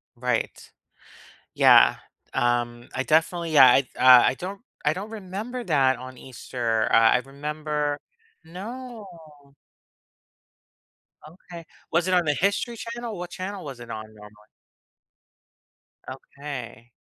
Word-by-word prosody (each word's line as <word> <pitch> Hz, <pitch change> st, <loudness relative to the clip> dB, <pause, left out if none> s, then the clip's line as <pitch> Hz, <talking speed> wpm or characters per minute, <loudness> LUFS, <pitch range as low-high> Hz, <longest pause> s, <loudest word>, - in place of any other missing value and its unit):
Right, -, -, -3 dB, 0.8 s
yeah, -, -, +6 dB, 0.4 s
um, 120 Hz, 0 st, -1 dB
I 130 Hz, -, -2 dB
definitely 165 Hz, +2 st, +1 dB
yeah, 140 Hz, -4 st, +8 dB, 0.3 s
I 125 Hz, -1 st, +7 dB
I -, -, -4 dB
don't 195 Hz, -, -7 dB, 0.2 s
I 150 Hz, -, +2 dB
don't 195 Hz, +5 st, -7 dB
remember 220 Hz, +4 st, -6 dB
that 135 Hz, -, +2 dB
on 130 Hz, 0 st, -10 dB
Easter, 120 Hz, -3 st, -3 dB
uh, -, -, +5 dB
I 115 Hz, +2 st, +5 dB
remember 150 Hz, +2 st, -3 dB, 0.5 s
no. 220 Hz, +7 st, -9 dB, 2.2 s
Okay 170 Hz, 0 st, -12 dB, 0.3 s
was 170 Hz, +2 st, +1 dB
it 185 Hz, -, +1 dB
on 175 Hz, -, +2 dB
the 150 Hz, -, +2 dB
history 200 Hz, +5 st, 0 dB
channel, 230 Hz, -2 st, -6 dB
what 180 Hz, 0 st, -6 dB
channel 190 Hz, +1 st, -6 dB
was 135 Hz, -4 st, -8 dB
it 120 Hz, -1 st, -11 dB
on 110 Hz, 0 st, -6 dB
normally? 105 Hz, 0 st, -16 dB, 1.6 s
Okay. 125 Hz, -5 st, -9 dB
150 Hz, 115 wpm, -24 LUFS, 125-185 Hz, 2.2 s, yeah